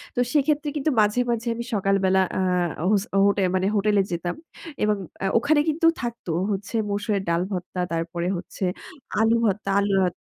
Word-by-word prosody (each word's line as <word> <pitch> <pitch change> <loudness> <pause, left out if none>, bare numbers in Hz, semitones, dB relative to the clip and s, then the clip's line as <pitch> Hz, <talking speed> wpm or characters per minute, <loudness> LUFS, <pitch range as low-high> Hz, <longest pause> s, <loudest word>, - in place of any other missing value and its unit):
তো - - -1
সেক্ষেত্রে 295 0 +2
কিন্তু 300 +1 0
মাঝে, 210 +3 +2
মাঝে 235 +1 -2
আমি 235 - -4
সকাল 195 -1 +2
বেলা 190 0 +3 0.2
আ - - +1 0.5
হোস 205 -2 +3 0.2
হোটে 200 -1 +2
মানে 185 +1 +1
হোটেলে 205 0 +3
যেতাম 175 +1 -2 0.5
এবং 210 0 +2 0.3
আ - - +1
ওখানে 295 +5 +3
কিন্তু 320 +2 0 0.2
থাকত 235 -1 -5 0.3
হচ্ছে 200 +3 -4
মসুরের 205 0 -1
ডাল 170 0 +2
ভর্তা, 180 0 -4
তারপরে 170 +1 -2
হচ্ছে 180 - -7 0.6
আলু 225 +1 +4
ভর্তা, 200 0 -1
আলু 200 0 0
অ - - +2
205 Hz, 170 wpm, -24 LUFS, 190-235 Hz, 0.6 s, আলু